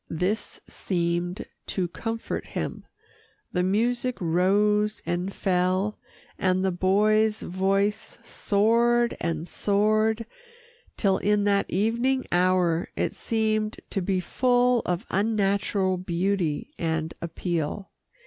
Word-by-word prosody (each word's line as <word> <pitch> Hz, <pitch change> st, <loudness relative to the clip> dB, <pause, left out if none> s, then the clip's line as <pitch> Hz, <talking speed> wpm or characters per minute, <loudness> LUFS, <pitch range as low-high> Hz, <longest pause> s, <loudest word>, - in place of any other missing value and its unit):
This 185 Hz, +7 st, -2 dB
seemed 175 Hz, 0 st, -2 dB, 0.2 s
to 185 Hz, -2 st, -1 dB
comfort 225 Hz, +6 st, -4 dB
him. -, -, -5 dB, 0.6 s
The 180 Hz, -, 0 dB
music 240 Hz, +6 st, 0 dB
rose 205 Hz, +5 st, +2 dB
and 180 Hz, +2 st, -2 dB
fell, 185 Hz, +2 st, 0 dB, 0.4 s
and 185 Hz, 0 st, +2 dB
the 190 Hz, -, +2 dB
boy's 210 Hz, +4 st, +2 dB
voice 195 Hz, +3 st, 0 dB
soared 235 Hz, +3 st, +2 dB
and 165 Hz, 0 st, -2 dB
soared 215 Hz, +3 st, +1 dB, 0.7 s
till 195 Hz, -3 st, +2 dB
in 210 Hz, 0 st, +2 dB
that 200 Hz, -1 st, +2 dB
evening 235 Hz, +7 st, +1 dB
hour, 180 Hz, -2 st, +2 dB
it -, -, -1 dB
seemed 215 Hz, -1 st, -1 dB
to 195 Hz, -, -1 dB
be 185 Hz, +1 st, 0 dB
full 245 Hz, +5 st, +2 dB
of 180 Hz, +4 st, -1 dB
unnatural 200 Hz, -2 st, +1 dB
beauty 180 Hz, -, -1 dB
and 160 Hz, -1 st, -1 dB
appeal. 170 Hz, +2 st, -3 dB
195 Hz, 105 wpm, -26 LUFS, 180-215 Hz, 0.7 s, rose